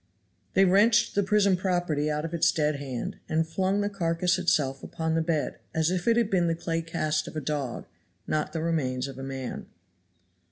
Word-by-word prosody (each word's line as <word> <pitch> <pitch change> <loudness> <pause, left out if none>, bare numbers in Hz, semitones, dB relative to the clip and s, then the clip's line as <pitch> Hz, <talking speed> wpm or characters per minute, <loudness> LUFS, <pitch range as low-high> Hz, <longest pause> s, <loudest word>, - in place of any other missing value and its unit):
They 195 - +6
wrenched 205 +5 +4
the 205 - +2
prison 200 -1 +3
property 175 -5 0
out 150 +1 -1
of 165 - -6
its 170 - +3
dead 150 -2 0
hand, 135 -4 -5
and 160 +1 +1
flung 190 +4 0
the 205 - 0
carcass 180 -1 0
itself 140 -6 +1
upon 160 0 -3
the 165 - +2
bed 160 -2 -1 0.2
as 160 +1 +2
if 180 +1 -2
it 230 0 +4
had 230 -3 +1
been 175 -3 +3
the 165 - +1
clay 165 0 -2
cast 155 -2 -1
of - - -9
a - - -1
dog, 140 -4 -3 0.4
not 155 0 -1
the 160 0 -3
remains 135 -6 -1
of 135 -1 -9
a - - -6
man. 135 -1 -5
165 Hz, 200 wpm, -27 LUFS, 150-185 Hz, 0.4 s, They